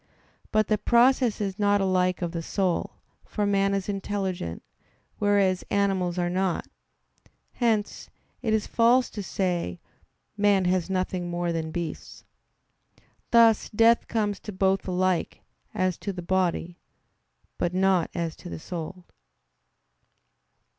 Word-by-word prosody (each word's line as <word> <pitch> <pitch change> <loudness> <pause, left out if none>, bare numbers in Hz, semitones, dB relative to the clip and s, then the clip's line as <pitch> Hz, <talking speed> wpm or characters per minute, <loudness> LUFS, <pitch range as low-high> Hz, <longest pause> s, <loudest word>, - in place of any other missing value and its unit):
But 215 0 +3
the 215 0 0
process 245 0 +3
is 200 -1 -3
not 205 0 +3
alike 185 -1 +1
of 170 - -2
the 170 -1 -4
soul; 185 +1 -1 0.3
for 210 - -2
man 195 0 +2
is 195 -2 -3
intelligent, 195 - -3 0.6
whereas 200 -3 +2
animals 190 -3 0
are 175 -1 +1
not. 185 0 -1 0.9
Hence 225 -4 -1 0.3
it 225 - -1
is 215 -1 +1
false 240 +2 +3
to 210 - -5
say: 175 - -2 0.6
"Man 200 -2 +3
has 180 0 +1
nothing 185 -1 -2
more 175 0 -1
than 160 -1 -3
beasts." 170 -1 -6 1.0
Thus 230 -2 +5
death 230 +2 +4
comes 210 -3 -1
to 210 - -7
both 190 0 +1
alike 185 -1 0 0.3
as 185 -4 -1
to 200 - -3
the 180 -2 -7
body, 175 -1 -1 0.8
by 175 - +1
not 185 -2 +2
as 170 -2 -2
to 175 - -10
the - - -5
soul. 175 +2 -7
190 Hz, 130 wpm, -26 LUFS, 180-205 Hz, 1.0 s, Thus